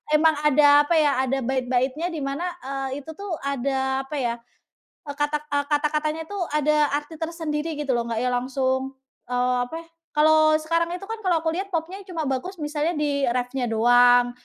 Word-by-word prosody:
emang 315 Hz, +1 st, +4 dB
ada 290 Hz, 0 st, +6 dB
apa 340 Hz, -, +2 dB
ya, 295 Hz, -2 st, +4 dB
ada 265 Hz, +1 st, 0 dB
bait-baitnya 260 Hz, +4 st, 0 dB
di 325 Hz, -, -4 dB
mana, 275 Hz, +5 st, -3 dB, 0.2 s
eee, 270 Hz, +1 st, -4 dB
itu 320 Hz, -, -8 dB
tuh 400 Hz, -1 st, -6 dB
ada 265 Hz, -1 st, -1 dB
apa 300 Hz, -, -5 dB
ya, 240 Hz, -3 st, 0 dB, 0.7 s
eee, 285 Hz, -1 st, -6 dB
kata, 295 Hz, +1 st, +1 dB, 0.2 s
eee, 285 Hz, 0 st, +1 dB
kata-katanya 305 Hz, +1 st, 0 dB
tuh 405 Hz, -1 st, -4 dB
ada 300 Hz, 0 st, +3 dB
arti 295 Hz, +2 st, -6 dB
tersendiri 325 Hz, -1 st, -3 dB
gitu 280 Hz, -3 st, -1 dB
loh, 235 Hz, -, -1 dB
nggak 230 Hz, -1 st, -2 dB
ya 250 Hz, -, +1 dB
langsung, 260 Hz, +1 st, -1 dB, 0.3 s
eee, 250 Hz, 0 st, +1 dB
apa, 325 Hz, -, -6 dB, 0.4 s
kalau 310 Hz, 0 st, +5 dB
sekarang 335 Hz, +2 st, 0 dB
itu 360 Hz, +2 st, -7 dB
kan 450 Hz, -, -3 dB
kalau 340 Hz, -3 st, +2 dB
aku 325 Hz, -, +1 dB
lihat 385 Hz, +3 st, -3 dB
popnya 335 Hz, +4 st, -2 dB
cuma 335 Hz, -3 st, -3 dB
bagus 270 Hz, +7 st, -3 dB
misalnya 300 Hz, +3 st, -1 dB
di 285 Hz, -2 st, 0 dB
reff-nya 245 Hz, +1 st, -1 dB
doang, 245 Hz, +2 st, +5 dB
290 Hz, 180 wpm, -24 LUFS, 260-315 Hz, 0.7 s, ada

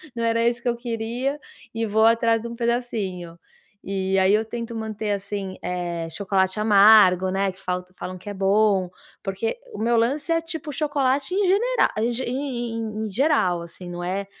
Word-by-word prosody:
não 230 Hz, -, -2 dB
era 230 Hz, 0 st, +2 dB
isso 235 Hz, 0 st, +1 dB
que 250 Hz, -, -5 dB
eu 240 Hz, -, 0 dB
queria", 240 Hz, +4 st, -3 dB, 0.3 s
e 225 Hz, 0 st, -1 dB
vou 220 Hz, +1 st, +3 dB
atrás 230 Hz, 0 st, +3 dB
de 235 Hz, -, -6 dB
um 235 Hz, -, -7 dB
pedacinho. 215 Hz, -8 st, -3 dB, 0.5 s
E 190 Hz, 0 st, 0 dB
aí 190 Hz, +1 st, +4 dB
eu 215 Hz, +1 st, +3 dB
tento 230 Hz, +1 st, -6 dB
manter, 220 Hz, -1 st, -3 dB
assim, 200 Hz, -1 st, -4 dB
eh, 175 Hz, -2 st, -3 dB
chocolate 190 Hz, +2 st, 0 dB
amargo, 205 Hz, -3 st, +6 dB
né, 195 Hz, +1 st, 0 dB
que 185 Hz, -, -19 dB
falta 180 Hz, 0 st, -4 dB
falam 185 Hz, 0 st, -6 dB
que 185 Hz, -, -16 dB
é -, -, -5 dB
bom, 195 Hz, -1 st, +2 dB, 0.3 s
porque 195 Hz, -, -3 dB
o -, -, -7 dB
meu 235 Hz, +2 st, +1 dB
lance 275 Hz, +8 st, +1 dB
é, 330 Hz, 0 st, +2 dB
tipo, 320 Hz, -2 st, -6 dB
chocolate 285 Hz, +2 st, 0 dB
em 405 Hz, -, +2 dB
genera 435 Hz, +7 st, +2 dB
em 230 Hz, +2 st, +1 dB, 0.2 s
em 245 Hz, -4 st, -3 dB
em 220 Hz, -1 st, -3 dB
em 215 Hz, -, -5 dB
geral, 205 Hz, -, +2 dB
assim, 170 Hz, +2 st, -10 dB
não 175 Hz, 0 st, -6 dB
é, 190 Hz, +3 st, -2 dB
220 Hz, 190 wpm, -23 LUFS, 190-240 Hz, 0.5 s, amargo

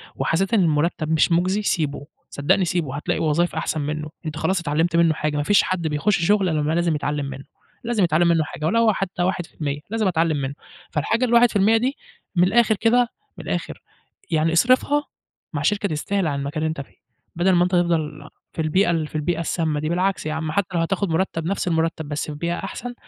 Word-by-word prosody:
وحسّيت 195 Hz, +6 st, 0 dB
إن 215 Hz, -, +5 dB
المرتّب 155 Hz, -1 st, +1 dB
مش 160 Hz, +2 st, +3 dB
مجزي 185 Hz, +5 st, +2 dB
سيبه، 150 Hz, -7 st, -1 dB, 0.2 s
صدقني 150 Hz, +6 st, +1 dB
سيبه، 165 Hz, -6 st, -2 dB
هتلاقي 150 Hz, -, -2 dB
وظايف 165 Hz, +3 st, +1 dB
أحسن 155 Hz, -, -2 dB
منه، 155 Hz, +1 st, -3 dB, 0.2 s
أنت 155 Hz, -1 st, -4 dB
خلاص 190 Hz, +2 st, 0 dB
اتعلّمت 165 Hz, +2 st, 0 dB
منه 165 Hz, -1 st, +4 dB
حاجة 150 Hz, -1 st, -2 dB
ما 145 Hz, -, 0 dB
فيش 205 Hz, +6 st, +4 dB
حد 175 Hz, -3 st, -1 dB
بيخش 165 Hz, +4 st, +1 dB
شغل 200 Hz, -2 st, +3 dB
إلا 155 Hz, -2 st, 0 dB
ما 155 Hz, +2 st, 0 dB
لازم 170 Hz, -2 st, +1 dB
يتعلّم 145 Hz, -1 st, -2 dB
منه، 135 Hz, +1 st, -7 dB, 0.4 s
لازم 230 Hz, -4 st, 0 dB
يتعلم 170 Hz, 0 st, +3 dB
منه 165 Hz, -2 st, +3 dB
حاجة 155 Hz, +1 st, -6 dB
ولو 225 Hz, +4 st, +3 dB
حتّى 180 Hz, -2 st, -2 dB
1% 160 Hz, -6 st, -3 dB
لازم 220 Hz, -2 st, 0 dB
أتعلّم 165 Hz, -3 st, +1 dB
منه، 135 Hz, 0 st, -3 dB, 0.4 s
فالحاجة 225 Hz, -, +1 dB
ال1% 225 Hz, -3 st, +4 dB
دي، 260 Hz, +5 st, -1 dB, 0.4 s
من 175 Hz, -, +4 dB
الآخر 220 Hz, +3 st, +3 dB
كده 240 Hz, +3 st, +3 dB, 0.3 s
من -, -, -9 dB
الآخر، -, -, -3 dB, 0.5 s
يعني 160 Hz, +1 st, +2 dB
أصرفها 255 Hz, -, +3 dB, 0.5 s
مع 145 Hz, -, -2 dB
شركة 200 Hz, +5 st, +1 dB
تستاهل 175 Hz, +4 st, -1 dB
عن 140 Hz, -1 st, -2 dB
مكان 150 Hz, +2 st, -3 dB
اللي 160 Hz, -, +1 dB
أنت 155 Hz, -3 st, -4 dB
فيه، -, -, -14 dB, 0.4 s
بدل 180 Hz, +3 st, +2 dB
ما 175 Hz, -1 st, +4 dB
أنت 180 Hz, -, -1 dB
تفضل 155 Hz, -4 st, 0 dB, 0.2 s
في 160 Hz, -, -3 dB
البيئة 175 Hz, +4 st, +2 dB
ال 160 Hz, -2 st, -1 dB
في -, -, -14 dB
البيئة 165 Hz, +2 st, -1 dB
السامّة 160 Hz, -2 st, -1 dB
دي، 155 Hz, +1 st, -2 dB
بالعكس 185 Hz, 0 st, 0 dB
يا 155 Hz, -, -2 dB
عم 160 Hz, -1 st, -3 dB
حتى 195 Hz, +2 st, 0 dB
لو -, -, +2 dB
هتاخد 195 Hz, +2 st, -1 dB
مرتّب 165 Hz, -1 st, -1 dB
نفْس 195 Hz, 0 st, -2 dB
المرتّب 165 Hz, -1 st, 0 dB
بس 145 Hz, -, -2 dB
في 145 Hz, -, -7 dB
بيئة 170 Hz, +2 st, -2 dB
أحسن، 245 Hz, +1 st, -6 dB
170 Hz, 205 wpm, -22 LUFS, 155-195 Hz, 0.5 s, إن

